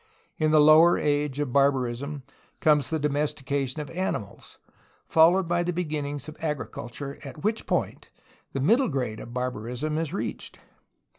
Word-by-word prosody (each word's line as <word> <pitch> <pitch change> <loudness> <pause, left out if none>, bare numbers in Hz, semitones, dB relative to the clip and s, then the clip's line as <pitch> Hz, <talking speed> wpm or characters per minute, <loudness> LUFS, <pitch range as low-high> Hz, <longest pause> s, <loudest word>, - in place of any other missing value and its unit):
In 155 - +2
the 155 0 +5
lower 155 +3 +7
age 145 -1 0
of 140 -4 -2
barbarism 140 0 +1 0.4
comes 150 -2 +3
the 160 - 0
domestication 145 -1 -1
of 145 -3 -8
animals, 165 - -4 0.5
followed 170 +3 +4
by 175 +1 +1
the 175 +1 -1
beginnings 150 -5 -3
of 155 - -9
agriculture, 140 -2 -5
at 145 +3 -9
which 215 +2 -1
point - - -2 0.4
the 135 - -3
middle 230 - +3
grade 125 -7 -2
of 120 - -9
barbarism 125 +5 -3
is 160 -3 -2
reached. - - -5
145 Hz, 145 wpm, -26 LUFS, 135-160 Hz, 0.5 s, lower